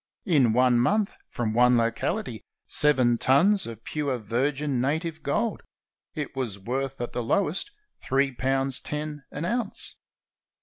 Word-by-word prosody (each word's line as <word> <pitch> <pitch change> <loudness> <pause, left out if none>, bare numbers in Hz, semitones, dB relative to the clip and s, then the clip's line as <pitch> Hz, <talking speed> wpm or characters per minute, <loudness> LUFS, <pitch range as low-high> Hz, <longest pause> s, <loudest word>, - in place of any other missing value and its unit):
In 145 - +4
one 125 0 +4
month, 205 - +2 0.2
from 115 -3 -2
one 125 +1 +5
locaHty, 115 - -1 0.3
seven 130 -6 +3
tons 190 - +4
of 115 -1 -9
pure 145 -4 -2
virgin 130 +4 -1
native 160 +4 -1
gold! 215 +10 -1 0.5
It 150 -3 -4
was 120 -7 -3
worth 130 +6 -3
at 120 - -4
the 120 - -1
lowest 185 - 0 0.3
three 135 +1 +1
pounds 135 +1 +1
ten 150 0 -5
an 150 +4 -4
ounce. 235 +2 -2
135 Hz, 135 wpm, -26 LUFS, 120-155 Hz, 0.5 s, one